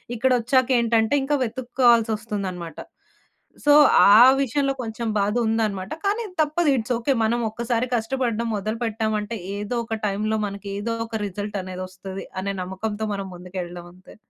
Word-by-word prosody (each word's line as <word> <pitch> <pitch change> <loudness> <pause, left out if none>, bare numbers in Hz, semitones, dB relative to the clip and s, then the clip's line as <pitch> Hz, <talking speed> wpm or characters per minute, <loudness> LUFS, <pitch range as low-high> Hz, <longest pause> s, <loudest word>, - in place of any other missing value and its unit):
ఇక్కడొచ్చాక 255 +1 +2
ఏంటంటే, 230 +1 +2
ఇంకా 290 +2 +1
వెతుక్కోవాల్సి 240 -1 +2
వస్తుందన్నమాట. 190 -6 -5 0.9
సో, 295 - +6 0.4
ఆ - - +9 0.2
విషయంలో 275 +2 0
కొంచెం 225 +1 -4
బాధ 205 +1 +1
ఉందన్నమాట. 215 -1 -1
కానీ 435 +4 0 0.2
తప్పదు. 310 +1 +1
It's 245 +2 -1
okay. 240 +4 +1
మనం 235 +2 +1
ఒక్కసారి 235 +1 -1
కష్టపడడం 235 0 -1
మొదలుపెట్టామంటే, 220 0 -2 0.2
ఏదో 210 +4 -3
ఒక 225 -1 -3
టైంలో 215 +2 -1
మనకి 200 0 -8
ఏదో 230 +3 -2
ఒక 220 -1 -4
రిజల్ట్ 205 +2 -5
అనేది 185 0 -6
ఒస్తది 190 +1 -8 0.2
అనే 200 +1 -2
నమ్మకంతో 205 +3 -4
మనం 195 -1 -5
ముందుకెళ్ళడం 175 -1 -7
అంతే. 185 +1 -17
220 Hz, 140 wpm, -23 LUFS, 200-240 Hz, 0.9 s, ఆ